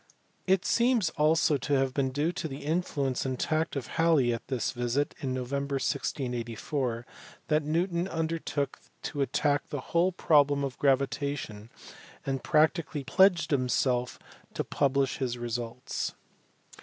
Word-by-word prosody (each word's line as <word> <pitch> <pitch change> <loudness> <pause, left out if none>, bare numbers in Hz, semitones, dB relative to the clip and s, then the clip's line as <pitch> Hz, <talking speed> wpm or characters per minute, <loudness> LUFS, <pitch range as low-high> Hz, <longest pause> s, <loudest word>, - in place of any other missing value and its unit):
It 190 0 +3
seems 235 -8 +3
also 155 -1 +3
to 140 +3 -2
have 135 -1 +1
been 135 -1 +1
due 145 +5 0
to 165 - -4
the 140 -1 -7
influence 145 -5 0
and 130 -2 -3
tact 155 +1 0
of 135 -4 -3
Halley 155 -7 +3
at 115 - -6
this 130 -5 -1
visit 120 +3 -1
in 135 -4 -2
November, 140 +2 -2
1684, 125 -2 -2 0.4
that 155 0 +3
Newton 170 +4 0
under 165 -1 -2
took 140 -3 -3 0.2
to 145 - -3
attack 145 +2 +1
the 145 - -3
whole 175 +2 +4
problem 145 -5 +3
of 135 -2 -4
gravitation, 140 -5 0 0.6
and 135 -1 -2
practically 155 -2 +2
pledged 180 +3 +4
himself 125 -2 +1 0.4
to - - 0
publish 140 -1 +1
his 125 -3 -1
results. 120 +2 -4
140 Hz, 140 wpm, -29 LUFS, 130-155 Hz, 0.6 s, whole